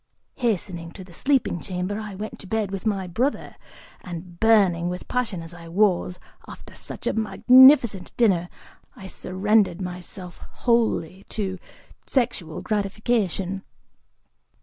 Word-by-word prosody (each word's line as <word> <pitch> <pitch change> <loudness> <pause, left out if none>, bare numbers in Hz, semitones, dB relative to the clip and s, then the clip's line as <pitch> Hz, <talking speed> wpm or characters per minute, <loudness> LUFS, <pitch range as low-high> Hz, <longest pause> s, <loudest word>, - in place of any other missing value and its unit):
(Hastening 185 -8 -2
to 190 - -9
the 180 -1 -15
sleeping 265 -4 +1
chamber, 185 +4 -3
I 210 -3 -6
went 215 +3 -7
to 190 - -11
bed 215 -1 -1
with 195 +2 -3
my 195 -3 0
"brother" 235 +11 -2 0.5
and, 175 -1 -8
burning 195 -6 +4
with 180 0 -6
passion 230 -9 -2
as 165 +1 -10
I 170 -1 -11
was, 180 0 +1 0.3
after - - -11
such - - -8
a - - +1
magnificent 240 -1 +6
dinner, 185 -7 +3 0.5
I 190 - -11
surrendered 190 0 +1
myself 180 0 -7
wholly 220 -6 0
to 190 -3 -3 0.5
sexual 230 - -1
gratification.) 200 -2 -1
195 Hz, 125 wpm, -24 LUFS, 180-220 Hz, 0.5 s, magnificent